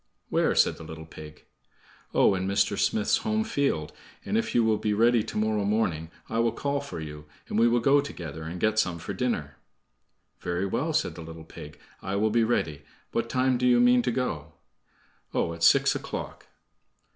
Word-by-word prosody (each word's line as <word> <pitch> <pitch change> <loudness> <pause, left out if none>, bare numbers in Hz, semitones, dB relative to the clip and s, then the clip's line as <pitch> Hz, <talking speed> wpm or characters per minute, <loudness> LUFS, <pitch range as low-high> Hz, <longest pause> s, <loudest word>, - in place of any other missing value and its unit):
"Where?" - - +2
said - - +3
the - - -10
little 80 0 -9
pig. 75 -1 -12 0.7
"Oh, - - +4
in 95 0 -2
Mr. 100 +1 +2
Smith's 220 - +2
home 220 0 0
field, 140 - -1 0.3
and 210 - -2
if 230 - 0
you 120 - +5
will 110 -1 +2
be 105 -1 0
ready 115 +2 +4
to - - -6
morrow 105 -1 +1
morning 95 -7 0 0.2
I 115 - -2
will 115 -1 +2
call 140 0 -1
for 140 -11 -7
you, 75 -1 -8 0.2
and 105 - -1
we 115 - +6
will 120 0 +2
go 140 +4 +5
together, 80 - -7
and 85 +3 -6
get 110 +2 +2
some 90 -5 0
for 85 +4 -6
dinner." 95 -10 -2 0.8
"Very 90 +2 -2
well," 145 +11 -1
said 155 - 0
the 85 - -9
little 80 0 -9
pig, 75 -1 -11 0.2
"I 95 - -3
will 105 +2 +2
be 115 +1 +3
ready. 80 -10 0 0.3
What - - -1
time 130 -1 +1
do 125 - +2
you 120 -1 +5
mean 125 0 +5
to 125 - 0
go?" 85 - -3 0.8
"Oh, 85 - 0
at 85 - -10
six 85 - +5
o'clock." - - -6
105 Hz, 195 wpm, -27 LUFS, 80-125 Hz, 0.8 s, we